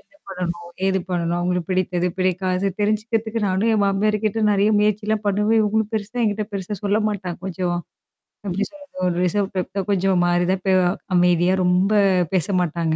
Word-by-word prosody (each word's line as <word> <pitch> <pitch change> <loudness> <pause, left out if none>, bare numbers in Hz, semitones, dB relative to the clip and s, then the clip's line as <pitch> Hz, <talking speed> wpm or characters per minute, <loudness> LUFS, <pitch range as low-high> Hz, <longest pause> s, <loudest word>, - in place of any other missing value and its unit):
என்னா 295 - -28
பண்ணணும்? 175 -2 -5 0.2
ஏது 190 0 +2
பண்ணணும்? 175 -1 -1
அவுங்களுக்கு 180 0 -1
பிடித்தது, 180 -1 0
பிடிக்காதது 185 +1 0
தெரிஞ்சுக்கிறதுக்கு 220 +1 -1
நானும் 190 +5 +1
என் 210 - +2
மாமியாருக்கிட்ட 210 +2 0
நெறைய 200 +1 +3
முயற்சிலாம் 210 +1 0
பண்ணுவேன். 210 +2 +2
இவுங்களும் 215 0 0
பெருசா 215 +3 -3
என்கிட்ட 210 -1 0
பெருசா 200 +1 -4
சொல்ல 205 +2 +2
மாட்டாங்க. 190 -4 -4
கொஞ்சோம் 175 -1 -2 0.7
எப்பிடி 195 +2 -1
சொல்றது? 290 -1 -16
ஒரு 175 - 0
ரிசர்வ் 195 +2 0
டைப் 185 +1 -3
தான் 195 0 -2
கொஞ்சம் 190 -2 +2
மாரிதான் 175 +2 +1
பே 190 - +3 0.4
அமைதியா 175 0 +3
ரொம்ப 180 +3 +2 0.4
பேச 185 -5 +2
மாட்டாங்க. 165 -1 -1
195 Hz, 160 wpm, -21 LUFS, 180-210 Hz, 0.7 s, நெறைய